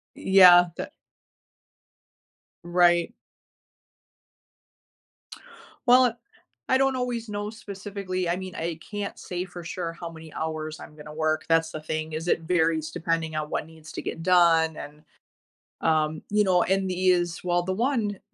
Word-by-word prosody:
Yeah, 180 -2 +7
tha - - -5 1.7
Right. 175 -1 +3 2.7
Well, 250 -1 +5 0.5
I 260 - +4
don't 270 -1 +2
always 245 -2 -3
know 205 0 -4
specifically. 200 -4 -5
I 170 - +1
mean, 185 -1 -7
I 165 0 -4
can't 205 -1 -5
say 180 0 -4
for 175 -1 -10
sure 170 0 -4
how 170 0 -8
many 160 -1 -12
hours 155 -1 -4
I'm 150 - -12
gonna 150 0 -10
work, 155 0 0
that's 165 0 +2
the 155 - -5
thing, 155 +1 -4
is 160 +2 -4
it 165 - +1
varies 160 -2 +1
depending 165 -1 -2
on 155 0 -3
what - - -2
needs 160 -1 -14
to - - -6
get 165 - -5
done, 165 -3 +4
and, 150 +1 -10 0.8
um, 155 -1 +1
you 210 +1 +3
know, 185 -3 +3
and 190 0 0
these 180 -2 +1
well, 175 -1 +1
the 190 - -3
one, 220 -2 -1
175 Hz, 145 wpm, -26 LUFS, 160-190 Hz, 2.7 s, Yeah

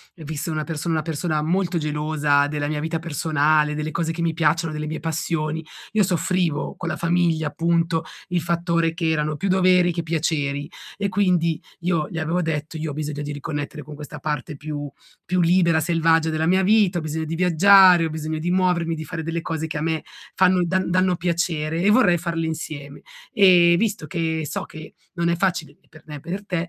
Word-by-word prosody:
visto 160 0 -5
una 155 -1 -2
persona 165 +2 -3
una 155 - -1
persona 155 0 -2
molto 175 +2 0
gelosa 150 -2 +1
della 145 0 -2
mia 150 -1 -2
vita 160 +2 -2
personale, 155 -2 +1
delle 155 +1 -3
cose 165 0 -2
che 170 - -5
mi 170 -1 +1
piacciono, 165 0 +1
delle 150 0 -4
mie 155 - -4
passioni, 160 0 -2 0.3
io 215 -1 +3
soffrivo 175 -3 0
con 170 - -5
la 155 - -2
famiglia 170 -2 +1
appunto 165 +1 0 0.3
il 180 -1 0
fattore 170 0 0
che 165 -1 -1
erano 155 -1 0
più 195 +6 -2
doveri 185 -1 +4
che 170 0 -3
piaceri; 150 -3 -1 0.3
e 200 0 -1
quindi 180 -4 +1 0.2
io 170 -3 0
gli 165 - -7
avevo 165 +3 0
detto: 160 -1 -3
"Io 155 -1 -3
ho - - -6
bisogno 150 0 -4
di 145 0 -4
riconnettere 145 +1 -5
con 150 - -10
questa 150 -1 -9
parte 150 0 -3
più 145 0 -6 0.4
più 180 0 +1
libera, 170 -1 +3
selvaggia 165 0 +2
della 160 0 0
mia 190 +2 +3
vita, 200 -3 +3
ho - - -6
bisogno 155 +1 -3
di 160 +1 -4
viaggiare, 180 0 +6
ho - - -2
bisogno 155 0 -4
di 170 +3 -2
muovermi, 180 -3 +1
di 155 - -6
fare 160 +1 -6
delle 165 +1 -3
cose 160 -1 -3
che 155 - -4
a - - -3
me 160 0 -1 0.3
fanno 185 -1 +4
da 185 +2 0
danno 185 0 +2
piacere 170 -2 -1
e 205 - +4
vorrei 205 -7 +4
farle 170 -1 -2
insieme. 150 -3 -6 0.3
Ehm, 175 -3 +6
visto 205 -5 -1
che 160 0 -2
so - - -3
che 155 0 -11 0.2
non 170 -1 0
è 170 - +2
facile 170 -5 -1
ne - - -33
per 155 - -17
me 150 - -7
e - - -7
per 190 +8 -6
te", 185 - -3
165 Hz, 205 wpm, -22 LUFS, 155-175 Hz, 0.4 s, viaggiare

